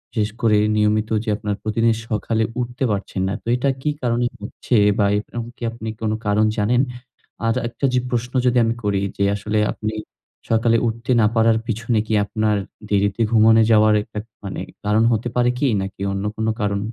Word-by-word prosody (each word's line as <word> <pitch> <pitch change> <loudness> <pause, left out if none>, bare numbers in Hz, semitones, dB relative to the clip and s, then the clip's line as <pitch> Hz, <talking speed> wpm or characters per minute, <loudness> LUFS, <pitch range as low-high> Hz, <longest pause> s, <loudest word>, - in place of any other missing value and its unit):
শেষ 105 -1 +1
করে 110 -2 +4 0.2
নিয়মিত 105 0 +1
যে 115 - -4
আপনার 105 -1 -3
প্রতিদিন 115 +1 +2 0.2
সকালে 110 +1 0 0.2
উঠতে 120 +2 -3
পারছেন 100 -2 -3
না। 95 - -1
তো - - -15
এটা 130 +3 0
কি 150 - 0
কারণে 120 0 +1 0.2
হচ্ছে 105 +4 -3 0.2
বা 100 - +3
এরকম 115 +2 -6
কি - - -31
আপনি 115 -1 -6
কোন 110 -1 0
কারণ 105 +1 +3
জানেন? 120 +5 +3 0.7
আজ 115 - +2
একটা 120 +4 -3
যে 125 - +3
প্রশ্ন 120 +1 -2
যদি 125 0 +3
আমি 115 - 0
করি 100 -1 0 0.2
যে 100 - +1
আসলে 105 +1 -1
আপনি 110 0 -4 0.6
সকালে 115 +1 +3
উঠতে 115 +3 -3
না - - +4
পারার 115 0 +4
পিছনে 115 0 0
কি - - -1
আপনার 110 0 0 0.3
দেরিতে 100 +2 +1
ঘুমানো 110 0 +6
যাওয়ার 110 0 +5
একতাক 105 0 -7 0.2
মানে 100 - -5
একটা - - -20
কারণ 110 +2 +3
হতে 115 +2 0
পারে 125 0 +3
কি? 140 +2 +1
নাকি 95 0 -7
অন্য 100 0 -3
কোন 110 +1 -2
কারণ 100 -1 0
110 Hz, 190 wpm, -21 LUFS, 105-115 Hz, 0.7 s, ঘুমানো